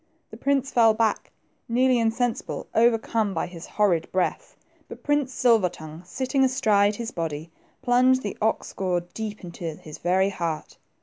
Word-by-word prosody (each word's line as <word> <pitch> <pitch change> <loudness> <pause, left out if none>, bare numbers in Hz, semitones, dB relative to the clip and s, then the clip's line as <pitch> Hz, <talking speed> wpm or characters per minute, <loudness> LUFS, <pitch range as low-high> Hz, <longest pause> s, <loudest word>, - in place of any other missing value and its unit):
The - - -9
prince 275 -1 0
fell 225 -2 +5
back, 220 -1 0 0.4
nearly 250 +1 +3
insensible, 230 +1 -1
overcome 225 -2 +2
by - - 0
his 175 -1 -10
horrid 180 -6 +1
breath; 185 -1 -2 0.3
but - - -10
Prince 290 -3 +1
Silver 230 -7 +3
tongue, 155 -1 -10
sitting 265 +5 0
astride 215 -6 +3
his 230 +1 -5
body, 160 -1 -4 0.3
plunged 255 +1 +4
the 205 - -4
ox 220 +1 0
goad 180 -2 -2
deep 215 -2 -5
into 175 0 -9
his 155 -1 -11
very 190 +2 +2
heart. 170 -5 -4
220 Hz, 150 wpm, -25 LUFS, 180-245 Hz, 0.4 s, fell